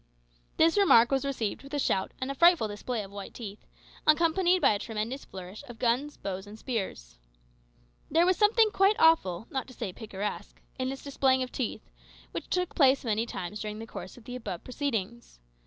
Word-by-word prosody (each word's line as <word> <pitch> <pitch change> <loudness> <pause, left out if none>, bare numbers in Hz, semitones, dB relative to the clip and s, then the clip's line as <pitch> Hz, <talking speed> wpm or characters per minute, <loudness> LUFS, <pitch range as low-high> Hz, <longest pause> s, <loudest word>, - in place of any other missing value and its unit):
This 330 +5 +4
remark 240 -12 +6
was 270 0 +2
received 245 -7 -2
with 275 +2 -7
a - - 0
shout 190 -7 0
and 260 +1 -2
a - - -2
frightful 340 -5 +5
display 215 +2 -4
of 195 - -11
white 200 -1 -8
teeth, 210 -3 -8 0.4
accompanied 340 +4 +4
by - - +5
a 205 - 0
tremendous 225 +5 -4
flourish 185 +5 -9
of 240 -2 -10
guns, 255 +5 0
bows, 190 0 -5
and 210 +1 -10
spears. 190 - -5 0.9
There 330 +3 +4
was 370 +1 +4
something 430 +2 +4
quite 390 +2 +4
awful, 225 - +4
not 265 -2 -3
to 255 - -13
say 200 -6 -4
picturesque, 210 -1 -6 0.2
in 255 0 0
this 270 0 -6
displaying 265 -2 +2
of 255 - -6
teeth, 255 - -4 0.4
which - - -6
took 360 -1 -1
place 270 -3 +4
many 225 +1 0
times 190 +1 -5
during 210 0 -4
the 225 - -7
course 190 -3 -9
of 245 - -14
the 245 +2 -7
above 205 -8 -6
proceedings. 235 - -4
245 Hz, 190 wpm, -29 LUFS, 210-290 Hz, 0.9 s, remark